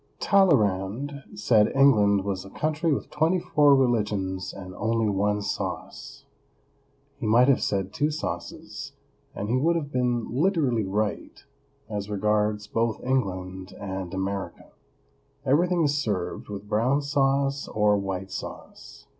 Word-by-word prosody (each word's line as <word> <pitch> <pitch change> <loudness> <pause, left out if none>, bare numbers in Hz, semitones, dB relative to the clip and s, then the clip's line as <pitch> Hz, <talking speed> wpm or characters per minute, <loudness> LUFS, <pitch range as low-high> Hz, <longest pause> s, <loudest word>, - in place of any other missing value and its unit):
TALLEYRAND 135 - +2
said 115 - +3
England 105 -8 +5
was 95 -2 -3
a 95 - -11
country 155 - -1
with 140 - -2
twenty 160 +4 +2
four 145 -4 +4
religions 105 -7 0
and 95 -1 -9
only 115 +2 0
one 105 +1 0
sauce. - - -5 0.9
He - - -3
might 120 +4 +5
have 140 - +4
said 95 -1 -1
two 150 +1 +1
sauces, 155 - -6 0.4
and 100 - -4
he 120 +4 +1
would 165 +5 +2
have 145 -4 -3
been 125 -3 0
literally 140 - +1
right 105 +1 -3 0.4
as 105 -1 -4
regards 105 +1 0
both 115 +1 -1
England 95 -7 -2
and 95 -3 -5
America. 95 +1 -4 0.7
Everything 170 +5 +3
is 145 -1 +2
served 95 -7 -3
with 100 0 -7
brown 125 +8 +1
sauce 140 0 +1
or 105 -1 +2
white 95 -1 -3
sauce. - - -9
110 Hz, 130 wpm, -26 LUFS, 100-140 Hz, 0.9 s, England